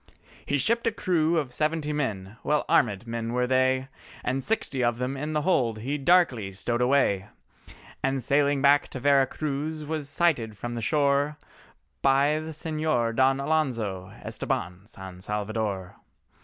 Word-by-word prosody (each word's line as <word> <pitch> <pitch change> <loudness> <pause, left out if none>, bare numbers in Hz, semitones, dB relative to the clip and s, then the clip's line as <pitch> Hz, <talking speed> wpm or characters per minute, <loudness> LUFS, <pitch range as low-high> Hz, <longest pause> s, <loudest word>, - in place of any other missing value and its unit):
He 145 - +1
shipped 230 - +1
a - - +3
crew 170 -5 +1
of 140 -6 -2
seventy 155 +1 -1
men—well 115 +1 -2
arméd 105 -1 +2
men 115 0 -4
were 125 0 +1
they, 130 +1 +2 0.4
And 130 +1 -1
sixty 210 - -1
of 120 -1 +1
them 125 +2 -2
in 150 +3 -4
the 150 -1 0
hold 120 -11 +2
he 140 +5 -2
darkly 135 - +3
stowed 120 +5 -2
away, 125 -7 +2 0.7
And 135 -1 0
sailing 140 0 +2
back 145 +1 +5
to 130 - -7
Vera 140 0 +4
Cruz 150 +2 -3
was 150 -2 -4
sighted 130 -11 +1
from 120 +2 -5
the 120 - -4
shore, 145 +3 +1 0.6
By 140 +3 +3
the 155 +1 -6
Señor 155 -7 -1
Don 135 +2 +3
Alonzo 115 -11 -1
Estabán 90 +4 -4
San 95 -3 -10
Salvador. 105 -2 -3
135 Hz, 150 wpm, -26 LUFS, 115-150 Hz, 0.7 s, back